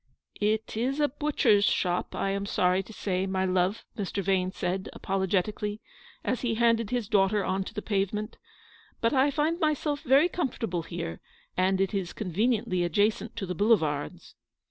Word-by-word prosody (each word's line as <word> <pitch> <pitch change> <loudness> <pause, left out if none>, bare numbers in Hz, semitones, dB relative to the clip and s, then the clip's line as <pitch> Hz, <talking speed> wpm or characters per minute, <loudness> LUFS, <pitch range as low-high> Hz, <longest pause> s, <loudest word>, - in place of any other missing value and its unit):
" - - -22
It 220 0 -5
is 260 +6 -1
a 295 - +4
butcher's 270 -7 +2
shop, 180 -3 0
I 195 - 0
am 200 0 -2
sorry 180 -1 +2
to 195 - -13
say, 190 -3 -2
my 190 0 0
love," 185 +2 0
Mr. 200 -2 -3
Vane 185 -1 +1
said, 190 0 -3
apologetically, 195 +2 -1 0.4
as 255 - -1
he 235 -3 0
handed 230 -2 +2
his 245 -3 -1
daughter 200 0 +2
on 190 +1 0
to - - -8
the 210 - -4
pavement; 210 +1 -1 0.6
"but 230 - +1
I 270 +1 +4
find 305 +4 0
myself 300 -2 0
very 280 +4 +5
comfortable 230 - -2
here, 165 - -6 0.3
and 190 +1 +2
it 195 0 +1
is 190 -3 -2
conve 190 -6 -5
niently 205 -7 +1
adjacent 205 +6 +1
to 220 -4 -3
the 180 - -3
Boulevards." 160 -8 0
205 Hz, 170 wpm, -28 LUFS, 185-230 Hz, 0.6 s, very